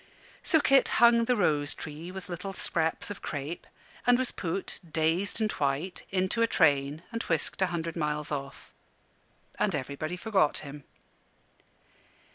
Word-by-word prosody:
So 320 - +3
Kit 275 -2 +5
hung 235 0 +6
the 250 - +2
rose 150 -8 +1
tree 160 +3 -7
with 190 0 -8
little 180 +2 -5
scraps 165 +1 -1
of 205 - -7
crape, 145 +3 -5 0.4
and 245 0 +6
was 255 -1 0
put, 180 +2 -4
dazed 165 +7 +1
and 215 -1 +1
white, 145 +6 -2
into 190 +4 0
a 230 - +5
train 145 -4 +2
and 230 -1 -3
whisked 165 +3 -1
a 190 - +4
hundred 165 -2 -3
miles 150 -2 -2
off. 140 -2 -6 0.9
And - - +2
everybody 150 +6 -4
forgot 190 -7 +2
him. 140 0 -9
170 Hz, 145 wpm, -29 LUFS, 150-200 Hz, 0.9 s, hung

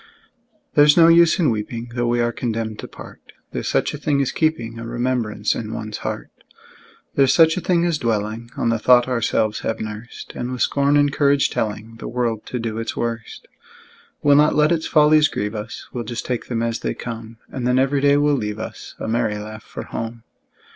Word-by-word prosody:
There's 145 0 +6
no 165 -1 +8
use 170 +1 +6
in 165 -9 +3
weeping, 115 +2 -4
Though 120 -1 -1
we 120 0 +1
are 120 0 +1
condemned 115 -2 -3
to - - -6
part: - - -12 0.3
There's - - -4
such - - +1
a 150 - -6
thing 145 -1 +1
as 135 - +1
keeping 120 -8 -1
A 115 - -6
remembrance 120 -3 -1
in 110 -1 -5
one's 110 -1 -5
heart: - - -5 0.8
There's 135 -2 +4
such 160 -1 +6
a 185 - -2
thing 175 -1 +2
as 170 -3 0
dwelling 110 0 -2
On - - +1
the 115 -1 +1
thought 120 +2 +5
ourselves 115 -3 0
have 110 - -3
nursed, 110 +2 -7
And 120 +1 -4
with 125 - 0
scorn 140 +1 +2
and 145 -1 +3
courage 140 -1 +3
telling 110 +1 -3
The - - -7
world 115 -3 -2
to 125 - -3
do 115 -2 -3
its 115 - -4
worst. 115 -1 -4 0.8
We'll 145 -1 +6
not 150 +1 +4
let 150 +2 +4
its 165 -2 0
follies 150 -1 +5
grieve 105 -5 -3
us, 105 +1 -6
We'll 120 - -3
just 115 0 -5
take 125 -2 -3
them 115 -2 -1
as 115 0 -1
they - - -3
come; 115 -1 -7
And 125 -2 -3
then 125 0 +3
every 135 +1 +2
day 140 0 +4
will 145 0 +3
leave 105 -5 -2
us 110 - -8
A - - -5
merry 110 -2 0
laugh 110 +1 -8
for - - -8
home. 115 0 -6
120 Hz, 210 wpm, -21 LUFS, 115-145 Hz, 0.8 s, no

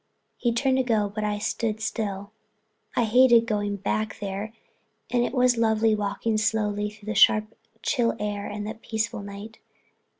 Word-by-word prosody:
He 240 - 0
turned 260 +3 +1
to 260 - +2
go 215 -4 +1
but 215 0 -3
I 210 0 -1
stood 220 +1 -2
still. 205 -2 -3 0.6
I 240 - +3
hated 235 +1 +5
going 205 -2 -1
back 215 +2 -2
there 200 +1 -4 0.6
and 245 -1 +2
it - - -1
was 250 -1 +3
lovely 220 -1 +3
walking 215 +1 -1
slowly 210 -1 0
along 210 - -3
through 210 -1 -17
the 215 - -2
sharp 215 0 +4 0.3
chill 240 -4 +1
air 205 -1 -3
and 205 0 -5
the 215 - -4
peaceful 220 -1 -3
night. 200 +2 -9
215 Hz, 170 wpm, -25 LUFS, 205-230 Hz, 0.6 s, hated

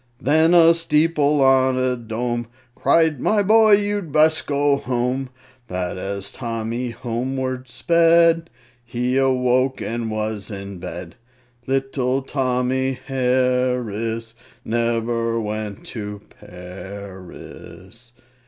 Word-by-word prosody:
Then 160 +5 +3
a 165 -1 +7
steeple 150 -3 +2
on 130 -1 +4
a 130 0 +1
dome 120 0 -3 0.3
Cried, 155 +2 +2
"My 210 - +2
boy, 215 +1 +5
you'd 205 -4 +1
best 155 +1 +3
go 145 0 +2
home." 125 +1 -2 0.4
But 90 -2 -3
as 100 +1 -5
Tommy 115 +1 -4
homeward 130 +2 -3
sped, 165 +5 +3 0.3
He 125 +2 -2
awoke 130 0 +2
and 115 0 -3
was 110 -1 -3
in 100 -2 -7
bed! 85 -1 -8 0.5
Little 135 0 -1
Tommy 130 0 0
Harris 125 -4 0 0.3
Never 115 0 0
went 105 -2 -5
to 105 -2 -6 0.2
Paris! 95 +4 -11
125 Hz, 100 wpm, -21 LUFS, 115-140 Hz, 0.5 s, a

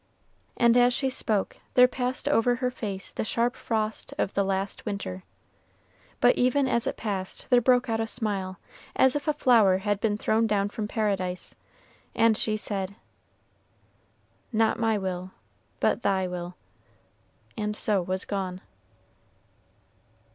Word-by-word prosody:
And 235 0 +5
as 245 0 +4
she 265 -2 0
spoke, 210 -5 -1 0.2
there 250 0 +8
passed 250 +2 -2
over 245 -4 +3
her 250 0 -1
face 200 -6 -4
the - - -3
sharp 235 +4 0
frost 220 -3 -3
of - - -1
the 200 - +2
last 195 0 -2
winter; 200 - -4 1.0
but 245 - +5
even 260 +2 +2
as 235 -2 0
it - - -2
passed 195 -4 -3
there 245 -1 +6
broke 250 +2 +3
out 225 -1 -1
a 225 - -1
smile, 200 -5 -2 0.4
as 265 +1 +4
if 290 0 -3
a 305 - +3
flower 230 -9 +4
had 205 +1 -1
been 210 -2 +1
thrown 220 +1 +1
down 205 -1 +1
from 210 0 -4
Paradise, 195 -5 -2 0.6
and 225 -1 +4
she 215 0 -1
said, 200 -2 -4 1.6
"Not 225 0 +2
my 225 -2 +2
will, 185 -1 -4 0.5
but - - +1
thy 190 -3 +1
will," 180 0 -6 1.0
and 210 -1 -2
so 210 -3 +1
was 185 +2 -2
gone. 185 -2 -3
215 Hz, 145 wpm, -27 LUFS, 195-240 Hz, 1.6 s, there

